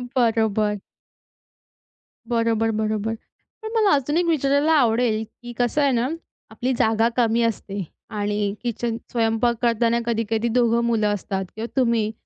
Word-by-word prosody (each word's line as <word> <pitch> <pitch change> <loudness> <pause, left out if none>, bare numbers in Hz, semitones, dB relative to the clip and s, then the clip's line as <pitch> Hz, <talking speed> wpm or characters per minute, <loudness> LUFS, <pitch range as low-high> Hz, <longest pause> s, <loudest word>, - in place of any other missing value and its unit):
बरोबर. 220 -4 +1 1.5
बरोबर, 230 -1 +1
बरोबर. 215 0 -1 0.5
पण 440 - -6
मला 430 -3 +4
अजून 290 +4 0
एक 355 - +2
विचारायला 295 -1 +2
आवडेल, 230 -5 +2
की 240 +2 -11
कसं 245 +5 +1
आहे 280 - +3
ना 245 0 +1 0.4
आपली 255 +1 -2
जागा 225 +1 +3
कमी 230 -1 +2
असते 200 -3 -2 0.3
आणि 205 -1 -1
किचन 235 -1 -2
स्वयंपाक 230 +1 +1
करताना 235 0 +2
कधी-कधी 225 0 0
दोघं 235 -1 +3
मुलं 225 -3 +1
असतात 195 -1 -3
किंवा 225 +2 -4
तुम्ही 230 -4 +2
230 Hz, 130 wpm, -23 LUFS, 220-245 Hz, 1.5 s, मला